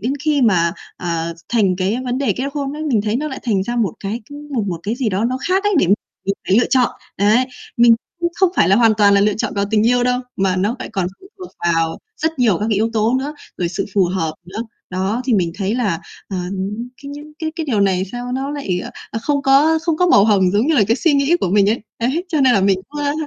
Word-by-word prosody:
đến 245 Hz, +7 st, -1 dB
khi 295 Hz, -3 st, +2 dB
mà, 170 Hz, -7 st, +3 dB, 0.2 s
à, 170 Hz, -1 st, -3 dB, 0.2 s
thành 200 Hz, -6 st, +2 dB
cái 190 Hz, +5 st, 0 dB
vấn 250 Hz, 0 st, -1 dB
đề 275 Hz, -, +1 dB
kết 260 Hz, -, -4 dB
hôn 280 Hz, -2 st, -2 dB
ấy, 310 Hz, -, -5 dB
mình 260 Hz, -9 st, +1 dB
thấy 215 Hz, +2 st, 0 dB
nó 305 Hz, +3 st, -2 dB
lại 265 Hz, -, -6 dB
thành 205 Hz, -6 st, +1 dB
ra 240 Hz, +4 st, -3 dB
một 215 Hz, -8 st, +1 dB
cái, 210 Hz, +4 st, -3 dB
ưm, 290 Hz, -, -8 dB, 0.2 s
một 225 Hz, -5 st, 0 dB
một 170 Hz, -3 st, -4 dB
cái 215 Hz, +3 st, -2 dB
gì 250 Hz, -3 st, -1 dB
đó 205 Hz, +2 st, -1 dB
nó 255 Hz, +2 st, 0 dB
khác 380 Hz, +2 st, +2 dB
ấy, 415 Hz, -1 st, +2 dB
để -, -, +3 dB
mình 200 Hz, +4 st, +4 dB, 0.5 s
phải 195 Hz, -, +5 dB
lựa 240 Hz, -, +3 dB
chọn. 255 Hz, -2 st, +4 dB, 0.3 s
Đấy. 215 Hz, +6 st, +4 dB, 0.3 s
Mình 235 Hz, -1 st, +7 dB, 0.3 s
cũng 345 Hz, 0 st, 0 dB
không 380 Hz, -2 st, +3 dB
phải 165 Hz, -, +4 dB
là 195 Hz, -, +5 dB
hoàn 230 Hz, -1 st, +5 dB
toàn 200 Hz, -1 st, +5 dB
là 200 Hz, -, +4 dB
lựa 205 Hz, 0 st, +2 dB
chọn -, -, -3 dB
vào 200 Hz, -1 st, +1 dB
tình 215 Hz, 0 st, +3 dB
yêu 245 Hz, 0 st, +3 dB
đâu, 250 Hz, 0 st, +1 dB, 0.2 s
mà 190 Hz, -1 st, +1 dB
nó 205 Hz, +6 st, 0 dB
phải -, -, -6 dB
còn 190 Hz, -3 st, 0 dB
phụ -, -, -14 dB
thuộc 365 Hz, -, -9 dB
vào 165 Hz, -1 st, +1 dB, 0.2 s
rất 320 Hz, -3 st, 0 dB
nhiều 220 Hz, -8 st, +3 dB
các 210 Hz, -, -1 dB
cái -, -, +3 dB
yếu 220 Hz, +3 st, +1 dB
tố 225 Hz, +2 st, +2 dB
nữa, 290 Hz, +3 st, -4 dB, 0.2 s
rồi 175 Hz, -, -1 dB
sự 175 Hz, -, -3 dB
phù 195 Hz, -, +4 dB
hợp 170 Hz, -3 st, -2 dB
nữa. 190 Hz, +4 st, -8 dB, 0.3 s
Đó, 190 Hz, +6 st, -1 dB
thì 250 Hz, -4 st, +2 dB
mình 170 Hz, -4 st, +1 dB
thấy 200 Hz, +2 st, -1 dB
là, 205 Hz, -10 st, 0 dB, 0.3 s
ờ, 195 Hz, -, -4 dB, 0.7 s
cái 280 Hz, -, -8 dB
những 295 Hz, +1 st, -9 dB
cái 315 Hz, -1 st, -2 dB
cái 320 Hz, -2 st, -3 dB
điều 220 Hz, -7 st, +1 dB
này 190 Hz, -2 st, +2 dB
sao 245 Hz, 0 st, -5 dB
nó 270 Hz, +2 st, -2 dB
lại, 235 Hz, -12 st, -2 dB
ờ, -, -, -7 dB, 0.2 s
ờ, 225 Hz, -, -3 dB
không 285 Hz, +2 st, 0 dB
có 285 Hz, +4 st, +4 dB
không 330 Hz, -2 st, 0 dB
có 360 Hz, +2 st, +3 dB
màu 200 Hz, -, +6 dB
hồng 195 Hz, -4 st, +3 dB
giống 210 Hz, +7 st, +2 dB
như 320 Hz, -, +2 dB
là 240 Hz, -, +5 dB
cái 230 Hz, -, +3 dB
suy 320 Hz, +2 st, +2 dB
nghĩ 280 Hz, +4 st, +3 dB
của 180 Hz, -, 0 dB
mình 200 Hz, 0 st, +4 dB
ấy. 230 Hz, -, 0 dB, 0.2 s
Đấy, 270 Hz, +10 st, 0 dB
cho 315 Hz, -4 st, 0 dB
nên 260 Hz, -2 st, +5 dB
là 200 Hz, -, +3 dB
mình 195 Hz, -1 st, +3 dB
cũng, 295 Hz, 0 st, -6 dB
ơ, 285 Hz, -, +1 dB
230 Hz, 275 wpm, -19 LUFS, 195-275 Hz, 0.7 s, Mình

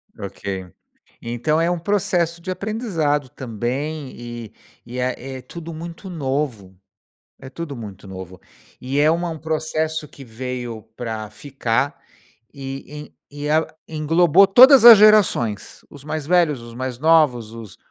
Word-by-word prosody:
Ok. 100 Hz, -2 st, -6 dB, 0.6 s
Então 120 Hz, +7 st, -1 dB
é 170 Hz, -, +1 dB
um 175 Hz, -, -1 dB
processo 175 Hz, -2 st, 0 dB
de 185 Hz, +2 st, -6 dB
aprendizado 185 Hz, -, -1 dB
também 130 Hz, +5 st, -4 dB
e 120 Hz, -2 st, -9 dB, 0.3 s
e 125 Hz, +2 st, -8 dB
é 130 Hz, +1 st, -3 dB
é -, -, -11 dB
tudo 170 Hz, +2 st, -9 dB
muito 170 Hz, +4 st, -8 dB
novo, 135 Hz, -, -3 dB, 0.6 s
é 130 Hz, -, -10 dB
tudo 160 Hz, -2 st, -7 dB
muito 105 Hz, -4 st, -9 dB
novo. 95 Hz, -1 st, -9 dB, 0.4 s
E 135 Hz, +3 st, -2 dB
é 155 Hz, +2 st, +5 dB
uma 170 Hz, +1 st, -1 dB
um 160 Hz, -1 st, -6 dB
processo 160 Hz, 0 st, -2 dB
que 140 Hz, -, -13 dB
veio 120 Hz, -1 st, -6 dB
pra 110 Hz, -3 st, -5 dB
ficar 130 Hz, +2 st, -2 dB, 0.5 s
e 140 Hz, +2 st, -8 dB, 0.2 s
e 145 Hz, +1 st, -5 dB
el 155 Hz, +2 st, +2 dB, 0.2 s
englobou 165 Hz, +4 st, +4 dB
todas 255 Hz, +4 st, +8 dB
as 235 Hz, -2 st, +12 dB
gerações, 200 Hz, -, +3 dB
os 140 Hz, -2 st, -14 dB
mais 155 Hz, 0 st, -4 dB
velhos, 160 Hz, -6 st, +2 dB
os 115 Hz, 0 st, -11 dB
mais 130 Hz, 0 st, -4 dB
novos, 150 Hz, -8 st, +3 dB
os 115 Hz, -4 st, -10 dB
145 Hz, 140 wpm, -21 LUFS, 120-165 Hz, 0.6 s, as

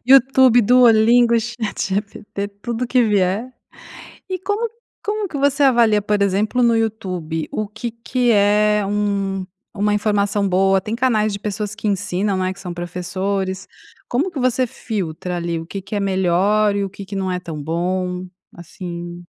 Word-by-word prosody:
YouTube, 260 Hz, -2 st, +6 dB
Duolingo, 235 Hz, 0 st, +5 dB
ChatGPT, 210 Hz, -3 st, -3 dB
tudo 240 Hz, +1 st, -2 dB
que 250 Hz, 0 st, +3 dB
vier. 205 Hz, +3 st, +1 dB, 0.8 s
E 370 Hz, -, -2 dB
como 410 Hz, +5 st, -1 dB, 0.4 s
como 420 Hz, 0 st, -1 dB
que 290 Hz, -, -5 dB
você 285 Hz, +1 st, +2 dB
avalia, 235 Hz, -5 st, +4 dB
por 205 Hz, 0 st, 0 dB
exemplo, 205 Hz, +5 st, +1 dB
no 235 Hz, -1 st, +4 dB
YouTube, 185 Hz, -8 st, -2 dB
o 215 Hz, -, -2 dB
que 230 Hz, +2 st, -6 dB
que 240 Hz, +1 st, 0 dB
é 210 Hz, 0 st, +3 dB
um 200 Hz, -2 st, -1 dB, 0.3 s
uma 210 Hz, 0 st, +1 dB
informação 205 Hz, -1 st, +1 dB
boa? 190 Hz, +1 st, +3 dB
Tem 215 Hz, +3 st, -3 dB
canais 225 Hz, -4 st, +1 dB
de 200 Hz, -, -4 dB
pessoas 210 Hz, 0 st, -4 dB
que 215 Hz, -1 st, -4 dB
ensinam, 200 Hz, 0 st, 0 dB
né, 185 Hz, 0 st, 0 dB
que 190 Hz, -, -10 dB
são 180 Hz, -2 st, -6 dB
professores, 185 Hz, +2 st, -3 dB, 0.4 s
como 290 Hz, +10 st, 0 dB
que 295 Hz, -, -5 dB
você 255 Hz, 0 st, +2 dB
filtra, 180 Hz, -6 st, -4 dB
ali, 170 Hz, -1 st, -2 dB
o 165 Hz, -, -7 dB
que 195 Hz, +3 st, -6 dB
que 195 Hz, +3 st, -6 dB
é 205 Hz, -, 0 dB
melhor, 195 Hz, +2 st, +2 dB
e 200 Hz, -, 0 dB
o 195 Hz, -, -3 dB
que 200 Hz, +1 st, -10 dB
que 200 Hz, -, -7 dB
não 190 Hz, -1 st, -1 dB
é 180 Hz, -, -2 dB
tão 160 Hz, -4 st, -7 dB
bom 180 Hz, +3 st, -2 dB, 0.3 s
assim? 175 Hz, -1 st, -8 dB
205 Hz, 165 wpm, -20 LUFS, 185-230 Hz, 0.8 s, YouTube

